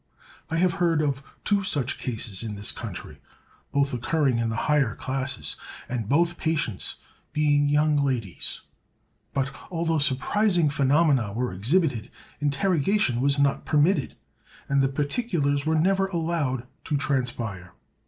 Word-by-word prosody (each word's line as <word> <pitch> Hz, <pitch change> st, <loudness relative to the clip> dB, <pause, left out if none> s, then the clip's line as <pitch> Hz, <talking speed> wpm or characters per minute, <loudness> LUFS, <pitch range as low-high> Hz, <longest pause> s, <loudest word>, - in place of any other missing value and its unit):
I 165 Hz, -, -1 dB
have 180 Hz, 0 st, +3 dB
heard 165 Hz, -3 st, +3 dB
of 140 Hz, -2 st, 0 dB, 0.2 s
two 205 Hz, -1 st, +2 dB
such 145 Hz, -9 st, -1 dB
cases 110 Hz, -5 st, -2 dB
in 110 Hz, -2 st, -4 dB
this 100 Hz, +1 st, +1 dB
country, -, -, -8 dB, 0.5 s
both 140 Hz, -1 st, +1 dB
occurring 130 Hz, 0 st, +1 dB
in 115 Hz, -1 st, 0 dB
the 110 Hz, -, -2 dB
higher 145 Hz, -6 st, +2 dB
classes, 130 Hz, +1 st, -3 dB, 0.3 s
and 115 Hz, -4 st, -3 dB
both 170 Hz, +4 st, +2 dB
patients 150 Hz, -, -1 dB, 0.4 s
being 145 Hz, -1 st, +3 dB
young 150 Hz, +1 st, +3 dB
ladies; 125 Hz, -10 st, -2 dB, 0.7 s
but, 135 Hz, 0 st, -2 dB
although 165 Hz, -2 st, 0 dB
surprising 160 Hz, +4 st, +2 dB
phenomena 140 Hz, -6 st, +3 dB
were 120 Hz, -2 st, -2 dB
exhibited, 120 Hz, -, +1 dB, 0.3 s
interrogation 150 Hz, -, +1 dB
was 140 Hz, +1 st, +2 dB
not 140 Hz, 0 st, +2 dB
permitted, 150 Hz, 0 st, +2 dB, 0.5 s
and 140 Hz, 0 st, +3 dB
the 135 Hz, -, +2 dB
particulars 145 Hz, -, 0 dB
were 160 Hz, -, +3 dB
never 195 Hz, +4 st, +3 dB
allowed 160 Hz, -8 st, -1 dB, 0.2 s
to 150 Hz, -, 0 dB
transpire. 120 Hz, -10 st, -2 dB
140 Hz, 135 wpm, -26 LUFS, 125-165 Hz, 0.7 s, have